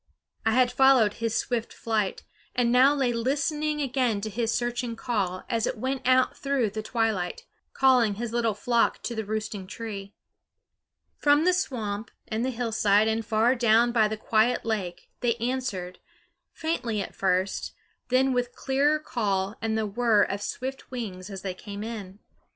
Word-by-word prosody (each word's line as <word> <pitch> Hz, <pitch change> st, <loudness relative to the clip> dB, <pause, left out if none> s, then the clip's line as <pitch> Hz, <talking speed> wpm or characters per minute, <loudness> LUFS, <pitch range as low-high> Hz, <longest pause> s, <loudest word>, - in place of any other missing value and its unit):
I 225 Hz, -, +3 dB
had 250 Hz, 0 st, +4 dB
followed 250 Hz, -5 st, +5 dB
his 230 Hz, 0 st, -1 dB
swift 235 Hz, -2 st, -2 dB
flight, 215 Hz, -4 st, -2 dB, 0.3 s
and 240 Hz, -1 st, +2 dB
now 260 Hz, +4 st, +6 dB
lay 260 Hz, -4 st, +1 dB
listening 295 Hz, +5 st, 0 dB
again 255 Hz, -5 st, 0 dB
to 215 Hz, +1 st, -4 dB
his 230 Hz, +1 st, -1 dB
searching 240 Hz, 0 st, -2 dB
call 200 Hz, -6 st, -2 dB
as 230 Hz, -3 st, 0 dB
it -, -, -3 dB
went 260 Hz, +2 st, -2 dB
out 255 Hz, 0 st, +4 dB
through 275 Hz, -6 st, 0 dB
the 215 Hz, +1 st, -4 dB
twilight, 225 Hz, -, -1 dB, 0.3 s
calling 250 Hz, -6 st, +4 dB
his 230 Hz, +2 st, -4 dB
little 230 Hz, -3 st, +1 dB
flock 235 Hz, +3 st, +1 dB
to 240 Hz, -, -3 dB
the 220 Hz, -1 st, -3 dB
roosting 210 Hz, -2 st, -4 dB
tree. 200 Hz, -2 st, -7 dB, 1.0 s
From 290 Hz, +2 st, +4 dB
the 365 Hz, -, +4 dB
swamp 225 Hz, -, -2 dB, 0.2 s
and 225 Hz, 0 st, -2 dB
the 260 Hz, -, 0 dB
hillside 220 Hz, -4 st, +2 dB
and 220 Hz, +1 st, 0 dB
far 225 Hz, +3 st, +3 dB
down 235 Hz, -1 st, +4 dB
by 225 Hz, -3 st, +4 dB
the 215 Hz, +1 st, -4 dB
quiet 220 Hz, +3 st, +2 dB
lake 195 Hz, -6 st, -3 dB
they 235 Hz, -2 st, +1 dB
answered, 230 Hz, -7 st, -3 dB, 0.5 s
faintly 250 Hz, -9 st, -2 dB
at 195 Hz, -, -4 dB
first, 185 Hz, 0 st, 0 dB, 0.4 s
then 260 Hz, +1 st, +3 dB
with 245 Hz, -1 st, -1 dB
clearer 280 Hz, +3 st, +2 dB
call 205 Hz, -8 st, -1 dB
and 220 Hz, 0 st, 0 dB
the 220 Hz, -, 0 dB
whirr 215 Hz, 0 st, +3 dB
of 200 Hz, +1 st, -3 dB
swift 265 Hz, +5 st, -5 dB
wings 205 Hz, -7 st, -6 dB
as 195 Hz, -2 st, -7 dB
they 190 Hz, -2 st, -3 dB
came 200 Hz, +2 st, -7 dB
in. 205 Hz, -4 st, -7 dB
230 Hz, 165 wpm, -27 LUFS, 210-255 Hz, 1.0 s, now